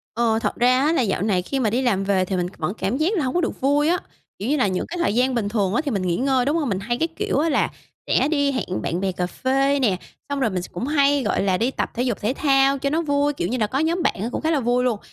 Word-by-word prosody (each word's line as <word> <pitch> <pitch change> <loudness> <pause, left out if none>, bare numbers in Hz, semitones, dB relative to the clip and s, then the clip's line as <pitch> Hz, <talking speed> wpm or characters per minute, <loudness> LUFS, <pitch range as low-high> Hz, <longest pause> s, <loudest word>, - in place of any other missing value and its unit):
Ờ, 225 -1 +2
thật - - -1
ra 250 +1 +3
á 320 - +3
là 265 - +2
dạo 195 -5 0
này 195 -4 +1
khi 270 +9 -3
mà 225 -4 +2
đi 245 +5 0
làm 200 -6 +1
về 190 -2 +1
thì 190 - -2
mình 180 -1 0
c - - -20
vẫn 170 +5 -2
cảm 225 +7 -1
giác 335 +8 +1
là 305 - +1
hổng 255 - -2
có 355 - +2
được - - -3
vui 290 +3 +2
á, 355 - +3 0.4
kiểu 215 +6 -3
như 300 - +2
là 205 - +2
những 185 -1 -1
cái 355 - -6
thời 340 -10 0
gian 255 +1 +2
bình 205 -3 -1
thường 200 -3 0
á - - +2
thì 280 - -1
mình 200 -3 -1
nghỉ 175 -2 0
ngơi, 260 -1 +1
đúng 300 +4 +1
hông? 290 -7 -1
Mình 190 -1 -1
hay, 240 +4 -2
cái 325 - +1
kiểu 410 -1 -2
á, 325 +2 +1
là 280 - +1 0.4
sẽ 275 - +2
đi 285 -2 +1
hẹn 200 -8 -3
bạn 170 - -2
bè 190 -1 0
cà 180 0 -2
phê 270 +6 +1
nè, 205 -8 +2 0.3
xong 285 -1 -2
rồi 245 -5 +2
mình 185 -2 -2
s - - -6
cũng 235 +10 -4
hay, 285 -2 +3
gọi 210 - 0
là, 185 -2 +2
đi 240 +4 0
tập - - -3
thể 245 - -1
dục 240 -5 -1
thể 220 +5 0
thao 275 -1 +3
cho 280 0 -1
nó 320 +3 0
vui, 290 -1 +1
kiểu 175 - -2
như 250 +5 -2
là, 215 -2 +1
có 265 +5 -2
nhóm 335 +3 0
bạn - - +2
á 230 - -2
cũng - - -3
khá 320 +1 0
là 300 - +2
vui 245 +1 +1
luôn. 235 -5 0
255 Hz, 330 wpm, -22 LUFS, 205-285 Hz, 0.4 s, ra